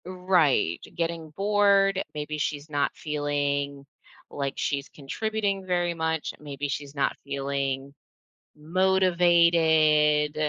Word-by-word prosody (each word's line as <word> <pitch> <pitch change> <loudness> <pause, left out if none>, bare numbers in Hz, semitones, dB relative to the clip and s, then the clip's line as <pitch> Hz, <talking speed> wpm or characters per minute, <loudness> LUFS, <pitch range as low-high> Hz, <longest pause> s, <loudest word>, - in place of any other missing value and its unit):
Right. 180 - +1 0.2
Getting 165 -1 -3
bored, 200 +1 +3
maybe 150 0 -4
she's 145 +1 -3
not 145 -1 0
feeling 145 -2 -2 0.4
like 140 -1 -3
she's 140 -1 -2
contributing 200 +6 -3
very 175 -1 0
much. 160 -1 -2
Maybe 145 -1 -5
she's 140 +1 -5
not 140 -1 0
feeling 140 0 -3 0.6
motivated. 165 -3 +3
155 Hz, 95 wpm, -26 LUFS, 140-180 Hz, 0.6 s, bored